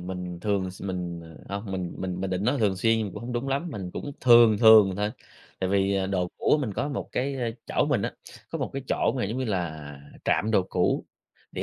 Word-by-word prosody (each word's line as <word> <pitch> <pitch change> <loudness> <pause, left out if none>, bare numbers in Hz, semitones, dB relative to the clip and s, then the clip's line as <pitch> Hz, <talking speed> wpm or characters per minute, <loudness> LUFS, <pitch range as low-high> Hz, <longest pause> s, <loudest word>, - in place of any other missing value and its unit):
mình 90 -1 -6
thường 100 -3 0
s 95 - -12
mình, 90 -3 -4 0.3
ờ, 100 - -3
hông 100 -2 -7
mình 90 -2 -3
mình 90 -1 -3
mình 95 -1 -2
định 95 +2 -1
nói 130 +3 +1
thường 100 -4 +2
xuyên 110 0 +1
cũng - - -8
hông 120 +1 -5
đúng 120 +3 -2
lắm, 140 +6 -1
mình 95 -7 -5
cũng 145 +9 -6
thường 120 -4 +7
thường 110 -4 +7
thôi. 105 +1 0 0.5
Tại 95 - -1
vì, 100 0 +2
à, 95 -1 0
đồ 90 -2 -1
cũ 150 - +3
mình 110 -7 -2
có 145 - -1
một 140 - -4
cái, 135 +2 -1
a 120 -3 -1 0.2
chỗ - - +1
mình 130 -9 +1
á, - - -2 0.4
có - - -3
một - - -3
cái 135 -1 -4
chỗ - - +1
mà 125 - 0
giống 110 +6 -3
như 130 - -1
là 80 - -4 0.2
trạm 110 - +1
đồ 100 -4 +4
cũ, 90 - +1 0.5
thì - - -1
100 Hz, 245 wpm, -26 LUFS, 95-120 Hz, 0.5 s, thường